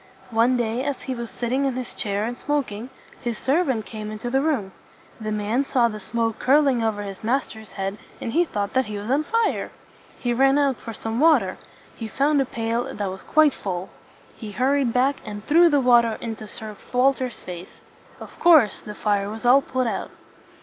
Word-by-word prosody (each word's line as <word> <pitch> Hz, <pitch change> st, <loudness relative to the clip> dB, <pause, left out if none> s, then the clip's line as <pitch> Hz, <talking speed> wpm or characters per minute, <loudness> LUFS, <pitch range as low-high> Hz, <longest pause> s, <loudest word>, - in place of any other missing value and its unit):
One 235 Hz, +3 st, +3 dB
day 235 Hz, +1 st, -1 dB
as 285 Hz, -2 st, -3 dB
he 260 Hz, -, -3 dB
was 235 Hz, -2 st, -5 dB
sitting 250 Hz, +3 st, -1 dB
in 265 Hz, -2 st, 0 dB
his 255 Hz, -1 st, -5 dB
chair 205 Hz, -1 st, -2 dB
and 240 Hz, +2 st, -3 dB
smoking, 255 Hz, -5 st, -2 dB, 0.3 s
his 235 Hz, -2 st, -3 dB
servant 265 Hz, -5 st, +1 dB
came 215 Hz, -1 st, -6 dB
into 215 Hz, +3 st, -5 dB
the 270 Hz, +1 st, +2 dB
room. 270 Hz, -11 st, 0 dB, 0.5 s
The 215 Hz, -1 st, -4 dB
man 215 Hz, +5 st, 0 dB
saw 250 Hz, -3 st, +2 dB
the 215 Hz, -1 st, -6 dB
smoke 225 Hz, +2 st, -2 dB
curling 270 Hz, -2 st, +4 dB
over 210 Hz, -2 st, -1 dB
his 195 Hz, 0 st, -8 dB
master's 220 Hz, -4 st, -2 dB
head, 195 Hz, +1 st, -4 dB, 0.2 s
and 230 Hz, -, -4 dB
he 340 Hz, +4 st, +4 dB
thought 205 Hz, -9 st, -3 dB
that 260 Hz, 0 st, +2 dB
he 210 Hz, -1 st, -5 dB
was 205 Hz, +4 st, -4 dB
on 290 Hz, +3 st, +2 dB
fire. 460 Hz, +6 st, 0 dB, 0.5 s
He 245 Hz, -2 st, -1 dB
ran 270 Hz, +3 st, +4 dB
out 280 Hz, -3 st, +2 dB
for 230 Hz, -, -8 dB
some 225 Hz, +1 st, -4 dB
water. 320 Hz, +1 st, +4 dB, 0.4 s
He 225 Hz, -, -6 dB
found 280 Hz, +5 st, +2 dB
a -, -, +1 dB
pail 230 Hz, 0 st, -2 dB
that 200 Hz, -2 st, -3 dB
was 190 Hz, -, -8 dB
quite 310 Hz, -1 st, +4 dB
full. 185 Hz, -2 st, -5 dB, 0.4 s
He 215 Hz, -3 st, -8 dB
hurried 265 Hz, +1 st, +2 dB
back, 260 Hz, +4 st, +2 dB
and 205 Hz, -1 st, -7 dB
threw 340 Hz, +3 st, +6 dB
the 290 Hz, -2 st, +3 dB
water 240 Hz, -3 st, +4 dB
into 225 Hz, -2 st, -6 dB
Sir 215 Hz, 0 st, -8 dB, 0.2 s
Walter's 255 Hz, -1 st, +1 dB
face. 180 Hz, 0 st, -9 dB, 0.4 s
Of -, -, -12 dB
course 305 Hz, -, +5 dB
the 210 Hz, -, -8 dB
fire 205 Hz, -1 st, 0 dB
was 220 Hz, +3 st, -7 dB
all 260 Hz, +3 st, +7 dB
put 255 Hz, -1 st, -1 dB
out. 230 Hz, -, -2 dB
235 Hz, 200 wpm, -23 LUFS, 215-270 Hz, 0.5 s, all